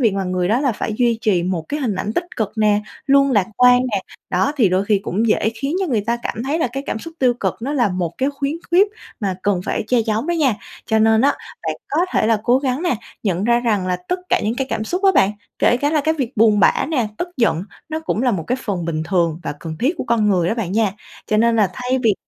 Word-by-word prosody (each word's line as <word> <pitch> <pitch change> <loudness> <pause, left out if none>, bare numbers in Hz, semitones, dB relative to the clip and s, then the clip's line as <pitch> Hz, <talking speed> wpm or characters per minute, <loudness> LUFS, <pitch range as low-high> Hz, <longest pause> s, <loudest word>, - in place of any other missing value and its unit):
việc 225 -6 +3
mà 195 -1 -1
người 180 0 -1
đó 230 +4 +2
là 270 -4 +1
phải 215 - -3
duy 235 -2 +2
trì 195 -6 +2
một 175 -2 -2
cái 295 +1 -2
hình 230 -7 -1
ảnh 205 +3 -3
tích 345 - -1
cực 215 -4 -1
nè, 210 -1 +3 0.3
luôn 275 0 +4
lạc 205 -5 +3
quan 250 0 +6
nè. 200 - +1 0.3
Đó, 190 +11 +1
thì 220 -8 +4
đôi 185 +2 +1
khi 205 -1 +2
cũng 220 +5 -1
dễ 220 0 +2
khiến 280 +7 -2
cho 380 - 0
người 235 -8 +1
ta 230 +3 -1
cảm 225 - -3
thấy 285 +5 -1
là 320 - +1
cái 270 +1 -3
cảm - - -2
xúc 330 +7 -10
tiêu 250 -2 +3
cực 240 - -2
nó 265 +5 -3
là 245 -7 +2
một 180 -3 -3
cái 270 +2 +1
khuyến 280 +1 -3 0.2
khuyết 380 +4 +5 0.3
mà 195 -3 -1
cần 200 -3 +1
phải - - -2
che 245 0 +3
giấu 220 0 -1
đó 345 - 0
nha. 290 -9 +2 0.3
Cho 220 -1 +2
nên 220 0 +4
á 280 +3 +4 0.4
bạn - - -1
có 300 - 0
thể - - +2
là 225 -2 +2
cố 245 +2 +4
gắng 265 +2 -1
nè, 350 -7 +1 0.3
nhận 190 -2 0
ra 235 +1 +3
rằng 210 -6 0
là 180 - 0
tất 360 +1 0
cả - - +2
những 220 +3 -1
cái 270 - -1
cảm 215 - -1
xúc 360 - -3
á 385 - +6
bạn, 195 - +4 0.3
kể - - +4
cả 285 +4 0
là 310 -1 +2
cái 315 +2 +1
việc 265 -5 -4
buồn 215 -1 +4
bã 210 - +3
nè, 255 -9 0
tức 350 - -2
giận, 220 -8 +1 0.3
nó 315 0 -3
cũng 310 -7 -2
là 250 - +3
một 175 -7 -2
cái 250 - 0
phần 190 -7 -3
bình 160 -1 -2
thường 170 -2 0
và - - -3
cần 160 -1 -6
thiết 280 +8 +1
của - - -2
con 230 -3 +2
người 180 -4 +2
đó - - 0
bạn 205 -7 -3
nha. 210 -2 +2 0.3
Cho 215 - +1
nên 230 +1 +3
là 205 -4 +3
thay 250 +4 -1
vì 220 -3 +4
225 Hz, 280 wpm, -20 LUFS, 200-270 Hz, 0.4 s, quan